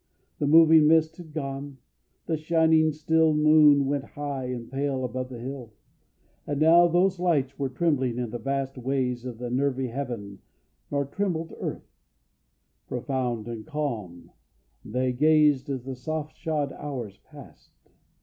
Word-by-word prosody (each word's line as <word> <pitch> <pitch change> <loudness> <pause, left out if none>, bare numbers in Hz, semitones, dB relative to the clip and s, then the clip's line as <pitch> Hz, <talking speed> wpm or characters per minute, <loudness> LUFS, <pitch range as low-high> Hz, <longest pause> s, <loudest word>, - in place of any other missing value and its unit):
The 145 - 0
moving 160 0 +7
mist 160 0 +3
had 170 -3 -11
gone, 140 -2 -5 0.5
and 160 -2 -1
shining 160 0 +3
still 160 +1 +2
The - - 0
moon 150 -2 +6
went 140 0 -1
high 140 -2 -5
and 125 -2 -5
pale 135 -1 -1
above 130 +1 -4
the 125 - -8
hill. 125 -2 -7 0.7
Not 145 - -2
now 165 +3 +6
those 180 +2 +2
lights 145 -7 0
were 135 -1 -1
trembling 130 -4 0
in 120 -3 -3
the 120 - -5
vast 135 +2 -3
Ways 125 -1 -2
of 125 -3 -6
the 120 0 -5
nervy 130 0 0
heaven, 115 -6 -6 0.5
nor 140 -1 -1
trembled 165 +1 -3
earth: - - -7 0.9
Profound 125 -3 -3
and 115 -2 -6
calm 115 - -5 0.5
they 125 +3 -1
gazed 150 -1 +3
as 130 -3 -3
the 130 0 -6
soft 155 +4 -5
shod 150 -3 -2
hours 125 -9 -6
passed. - - -17
140 Hz, 150 wpm, -26 LUFS, 125-155 Hz, 0.9 s, moving